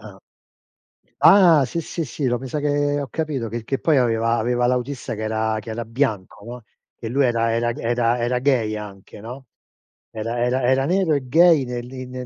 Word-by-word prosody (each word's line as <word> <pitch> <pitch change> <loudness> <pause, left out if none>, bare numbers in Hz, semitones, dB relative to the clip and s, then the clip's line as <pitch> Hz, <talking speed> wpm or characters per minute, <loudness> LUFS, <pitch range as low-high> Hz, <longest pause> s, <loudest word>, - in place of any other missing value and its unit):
ah. - - -19 1.0
Ah 175 -7 +7
sì 170 +6 -4
sì, 165 +1 -5 0.2
io 125 -2 +1
me 130 - -8
sa 150 +4 -3
che 145 0 0
ho 140 - -4
capito, 145 -6 -3
che 115 +1 -5
che 135 +4 -3
poi 155 -3 +2
aveva 115 -2 +1
aveva 120 +2 0
l'autista 125 -1 -2
che 110 - -7
era 110 0 -1
che 110 - -10
era 115 +1 -4
bianco, 110 -5 -3
no, 120 0 -9 0.4
e 115 - -6
lui 135 +3 +2
era 115 -1 +1
era 120 +1 0
g - - -8
era 120 0 0
era 120 +1 0
gay 125 -5 +1
anche, 105 -2 -10
no, 125 +4 -9 0.7
era 115 +2 -4
era 125 +1 0
era 130 +2 +2
nero 180 0 +1
e 140 -3 -1
gay, 165 +1 +5
negli 125 +1 -6
negli 125 0 -7
125 Hz, 195 wpm, -21 LUFS, 115-140 Hz, 1.0 s, Ah